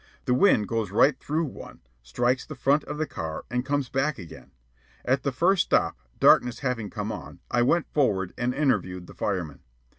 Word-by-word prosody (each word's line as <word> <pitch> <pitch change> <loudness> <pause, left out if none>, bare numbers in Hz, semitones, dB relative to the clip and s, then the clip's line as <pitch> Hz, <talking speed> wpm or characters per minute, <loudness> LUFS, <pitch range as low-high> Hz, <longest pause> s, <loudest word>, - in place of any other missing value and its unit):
The 125 - +2
wind 125 - +4
goes 115 -3 -1
right 130 +9 +4
through 160 +3 -1
one, 140 - -10 0.2
strikes 120 - 0
the 155 - -9
front 140 +3 +2
of - - -5
the 155 - 0
car, 80 - -6
and 125 0 0
comes 140 0 -1
back 135 +3 -1
again. 85 -7 -11 0.6
At 130 +2 +2
the 140 - -1
first 175 +8 +2
stop, - - +2 0.2
darkness 125 0 +4
having 125 -6 -2
come - - -4
on, - - -8
I 120 - +2
went 165 +7 +2
forward 95 - +1
and 120 +1 -1
interviewed 125 -10 0
the - - -13
fireman. 90 -8 -3
125 Hz, 185 wpm, -26 LUFS, 105-145 Hz, 0.6 s, wind